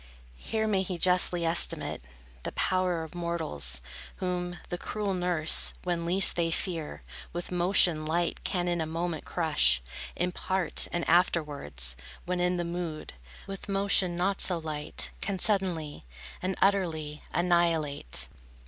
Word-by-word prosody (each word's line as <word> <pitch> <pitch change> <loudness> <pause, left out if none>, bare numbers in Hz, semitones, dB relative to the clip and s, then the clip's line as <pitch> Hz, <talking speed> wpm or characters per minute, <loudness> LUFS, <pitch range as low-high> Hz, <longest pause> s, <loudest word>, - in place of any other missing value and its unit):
Here 220 - -2
may 200 -3 +2
he 185 -1 -3
justly 180 -1 +5
estimate 165 - +1 0.4
The - - -4
power 185 -3 0
of 160 - -10
mortals, 165 - -1 0.3
whom 180 -1 -3
The 175 - -3
cruel 210 -2 -2
nurse, 175 -3 +2
when 170 -2 -2
least 185 +2 +5
they 170 -1 +1
fear, 165 - -3 0.3
With 175 +1 -4
motion 175 -3 +3
light 170 +2 -1
can 180 -1 -1
in 175 -1 0
a 160 - -2
moment 165 0 -3
crush 150 - +3 0.4
In 180 +1 -1
part, 185 -2 +1
and 175 - -2
afterwards, 145 - +1 0.3
when 180 0 -1
in 180 0 +1
the 175 - -2
mood, 170 -2 -5 0.3
With 195 +1 -8
motion 195 -3 +2
not 195 +2 0
so 180 - +3
light, 155 -2 -2
can 200 -1 -2
suddenly, 180 - 0 0.4
And 190 0 -2
utterly 165 -7 0
annihilate. 165 - +1
175 Hz, 140 wpm, -29 LUFS, 160-185 Hz, 0.4 s, justly